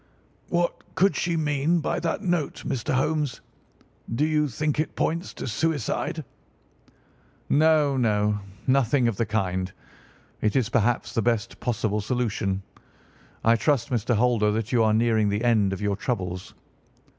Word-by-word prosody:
"What 175 Hz, 0 st, -2 dB
could 195 Hz, +1 st, +3 dB
she 170 Hz, -1 st, 0 dB
mean 150 Hz, +2 st, +1 dB
by 155 Hz, -, -1 dB
that 170 Hz, +4 st, -2 dB
note, 175 Hz, -6 st, -1 dB
Mr. 125 Hz, -, -2 dB
Holmes? 145 Hz, -1 st, 0 dB, 0.8 s
Do 150 Hz, -, +2 dB
you 155 Hz, -1 st, +2 dB
think 150 Hz, +3 st, -2 dB
it 155 Hz, -, -1 dB
points 165 Hz, +2 st, -1 dB
to -, -, -5 dB
suicide?" 145 Hz, +3 st, -1 dB, 1.2 s
"No, 150 Hz, -2 st, +4 dB
no, 105 Hz, -3 st, +1 dB, 0.3 s
nothing 130 Hz, -1 st, +3 dB
of 115 Hz, -4 st, -1 dB
the 115 Hz, -, 0 dB
kind. 95 Hz, -4 st, -1 dB, 0.7 s
It 105 Hz, -, +1 dB
is 125 Hz, -5 st, +2 dB
perhaps 115 Hz, 0 st, +1 dB
the 115 Hz, -, +1 dB
best 115 Hz, -1 st, -1 dB
possible 110 Hz, -3 st, -1 dB
solution. 105 Hz, -4 st, -1 dB, 0.8 s
I 115 Hz, +1 st, +5 dB
trust, 140 Hz, +1 st, +1 dB
Mr. 120 Hz, 0 st, +1 dB
Holder, 115 Hz, -2 st, +3 dB
that 110 Hz, +1 st, -2 dB
you 120 Hz, -3 st, +3 dB
are 110 Hz, -1 st, +3 dB
nearing 110 Hz, -2 st, +2 dB
the 105 Hz, +3 st, -1 dB
end 110 Hz, -5 st, +3 dB
of 95 Hz, -, -4 dB
your 100 Hz, -1 st, 0 dB
troubles." 95 Hz, -5 st, -4 dB
120 Hz, 145 wpm, -25 LUFS, 105-150 Hz, 1.2 s, I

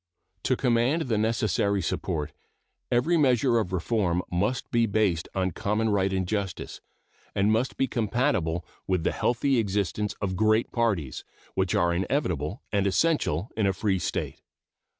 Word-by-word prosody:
To 130 Hz, -, +3 dB
command 125 Hz, +6 st, +2 dB
the 115 Hz, -6 st, 0 dB
necessary 105 Hz, -2 st, +1 dB
support, 80 Hz, -3 st, -2 dB, 0.6 s
every 130 Hz, +8 st, +3 dB
measure 125 Hz, -4 st, +3 dB
of 95 Hz, -5 st, -2 dB
reform 90 Hz, -1 st, 0 dB
must 105 Hz, +8 st, -1 dB
be 115 Hz, -1 st, +3 dB
based 100 Hz, -6 st, +1 dB
on 95 Hz, -1 st, 0 dB
common 105 Hz, +6 st, 0 dB
right 95 Hz, -2 st, +2 dB
and 95 Hz, -1 st, -1 dB
justice, 100 Hz, -2 st, -3 dB, 0.5 s
and 100 Hz, +2 st, +3 dB
must 115 Hz, +4 st, 0 dB
be 135 Hz, -, +2 dB
compatible 110 Hz, -, 0 dB, 0.2 s
with 90 Hz, -3 st, +1 dB
the -, -, +1 dB
healthy 125 Hz, +2 st, +1 dB
existence 105 Hz, 0 st, -1 dB
of 95 Hz, -2 st, -2 dB
great 110 Hz, +3 st, +2 dB
parties, 100 Hz, -, -1 dB, 0.3 s
which 95 Hz, -1 st, 0 dB
are 85 Hz, 0 st, +3 dB
inevitable 95 Hz, -, -1 dB
and 100 Hz, -1 st, +2 dB
essential 100 Hz, -, +1 dB
in 110 Hz, -3 st, +1 dB
a 95 Hz, -, +2 dB
free 95 Hz, 0 st, 0 dB
state. -, -, -3 dB
105 Hz, 150 wpm, -27 LUFS, 95-115 Hz, 0.6 s, To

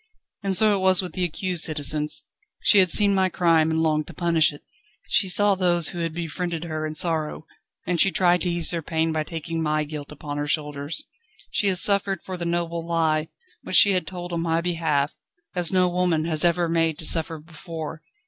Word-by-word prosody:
And 195 Hz, -2 st, 0 dB
so 215 Hz, +1 st, +5 dB
it -, -, -2 dB
was 190 Hz, 0 st, +4 dB
with 180 Hz, -3 st, -6 dB
the 185 Hz, -, -2 dB
accused, 180 Hz, 0 st, 0 dB
citizens. 150 Hz, 0 st, 0 dB, 0.4 s
She 205 Hz, -, +5 dB
had 185 Hz, -1 st, +4 dB
seen 205 Hz, +2 st, +5 dB
my 190 Hz, -1 st, +2 dB
crime, 165 Hz, -3 st, +2 dB
and 160 Hz, 0 st, 0 dB
longed 155 Hz, -1 st, 0 dB
to 170 Hz, -, -11 dB
punish 165 Hz, -2 st, +2 dB
it; 145 Hz, -, -14 dB, 0.4 s
she 190 Hz, -, +2 dB
saw 205 Hz, +3 st, +3 dB
those 175 Hz, -4 st, +2 dB
who 175 Hz, -, -6 dB
had 165 Hz, -1 st, -2 dB
befriended 170 Hz, 0 st, -4 dB
her 155 Hz, -2 st, -4 dB
in 155 Hz, -, -7 dB
sorrow, 155 Hz, -1 st, -2 dB, 0.4 s
and 175 Hz, -2 st, +1 dB
she 195 Hz, -, +5 dB
tried 175 Hz, 0 st, +2 dB
to 180 Hz, -, -1 dB
ease 170 Hz, -2 st, +1 dB
their 170 Hz, -1 st, -2 dB
pain 160 Hz, +1 st, -1 dB
by 155 Hz, -1 st, -1 dB
taking 165 Hz, +1 st, -5 dB
my 155 Hz, -1 st, 0 dB
guilt 150 Hz, -1 st, -8 dB
upon 145 Hz, 0 st, -6 dB
her 145 Hz, -, -3 dB
shoulders. 150 Hz, -, -3 dB, 0.5 s
She 205 Hz, -, +1 dB
has 185 Hz, -2 st, +5 dB
suffered 200 Hz, -2 st, +1 dB
for 185 Hz, -, -6 dB
the 175 Hz, -1 st, -5 dB
noble 170 Hz, 0 st, -2 dB
lie, 160 Hz, -2 st, 0 dB, 0.3 s
which -, -, -4 dB
she 200 Hz, -, +7 dB
had 185 Hz, -4 st, -1 dB
told 175 Hz, -1 st, -7 dB
on 170 Hz, -, -2 dB
my 165 Hz, 0 st, 0 dB
behalf, 160 Hz, -4 st, -1 dB, 0.4 s
as 175 Hz, -2 st, -1 dB
no 185 Hz, -1 st, +3 dB
woman 175 Hz, -3 st, 0 dB
has 160 Hz, -1 st, +1 dB
ever 175 Hz, 0 st, +2 dB
been 165 Hz, -, -2 dB
made 165 Hz, -2 st, +1 dB
to 160 Hz, -, -5 dB
suffer 165 Hz, 0 st, +3 dB
before. 160 Hz, 0 st, -9 dB
165 Hz, 215 wpm, -23 LUFS, 155-180 Hz, 0.5 s, she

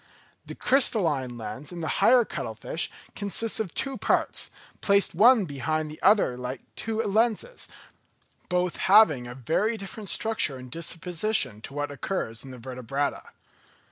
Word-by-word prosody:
The -, -, -7 dB
crystalline 160 Hz, -, +1 dB
lens 115 Hz, +7 st, -6 dB
in 175 Hz, -1 st, -6 dB
the 160 Hz, -, -3 dB
higher 250 Hz, -2 st, +6 dB
cuttle 110 Hz, -, -5 dB
fish 160 Hz, +8 st, -2 dB, 0.3 s
consists 210 Hz, +2 st, -1 dB
of 210 Hz, -6 st, -2 dB
two 270 Hz, -1 st, -2 dB
parts, -, -, +1 dB, 0.3 s
placed 200 Hz, -1 st, +3 dB
one 220 Hz, +4 st, +6 dB
behind 155 Hz, +1 st, -2 dB
the 155 Hz, -, -11 dB
other 200 Hz, -, +4 dB
like 125 Hz, +1 st, -5 dB
two 225 Hz, 0 st, -2 dB
lenses, 230 Hz, -, 0 dB, 0.8 s
both 180 Hz, -1 st, 0 dB
having 185 Hz, -, +5 dB
a 125 Hz, -, -8 dB
very 185 Hz, -, 0 dB
different 200 Hz, 0 st, -6 dB
structure 215 Hz, -10 st, +1 dB
and 130 Hz, -1 st, -11 dB
disposition 165 Hz, -, 0 dB
to 140 Hz, -, -9 dB
what 145 Hz, 0 st, -2 dB
occurs 135 Hz, -6 st, -4 dB
in 135 Hz, -, -10 dB
the 130 Hz, -, -9 dB
vertebrata. 130 Hz, +3 st, -3 dB
165 Hz, 145 wpm, -26 LUFS, 130-215 Hz, 0.8 s, higher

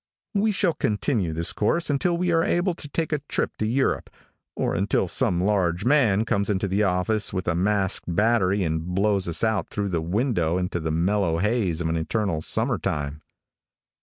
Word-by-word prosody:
We 210 Hz, +1 st, +2 dB
shall 185 Hz, -4 st, +1 dB
continue 105 Hz, -, -1 dB
this 85 Hz, +1 st, -1 dB
course 165 Hz, +11 st, +1 dB
until 170 Hz, +5 st, +1 dB
we 180 Hz, 0 st, 0 dB
are 165 Hz, -1 st, +3 dB
able 175 Hz, +1 st, +1 dB
to 150 Hz, -3 st, -7 dB
take 160 Hz, +1 st, -2 dB
a 150 Hz, -, +1 dB
trip -, -, -1 dB
to 110 Hz, -, -1 dB
Europe, 130 Hz, +4 st, 0 dB, 0.5 s
or -, -, -1 dB
until 95 Hz, +1 st, +1 dB
some 90 Hz, -3 st, 0 dB
large 95 Hz, -3 st, +1 dB
man 115 Hz, -7 st, +3 dB
comes 100 Hz, -2 st, 0 dB
into 100 Hz, -1 st, 0 dB
the 100 Hz, +3 st, 0 dB
office 100 Hz, +2 st, +1 dB
with 95 Hz, -2 st, -4 dB
a 85 Hz, -, +2 dB
masked 95 Hz, +2 st, +1 dB
battery 105 Hz, -2 st, +2 dB
and 80 Hz, -1 st, -1 dB
blows 95 Hz, +2 st, 0 dB
us 85 Hz, -, +1 dB
out 110 Hz, -6 st, 0 dB
through 100 Hz, -1 st, -2 dB
the 85 Hz, -3 st, -1 dB
window 90 Hz, -, 0 dB
into 90 Hz, -1 st, -2 dB
the 80 Hz, -1 st, -3 dB
mellow 85 Hz, +1 st, +1 dB
haze 100 Hz, -4 st, 0 dB
of 85 Hz, -, -1 dB
an 80 Hz, 0 st, 0 dB
eternal 85 Hz, 0 st, -1 dB
summer -, -, 0 dB
time. 75 Hz, +1 st, -3 dB
100 Hz, 190 wpm, -24 LUFS, 85-115 Hz, 0.5 s, are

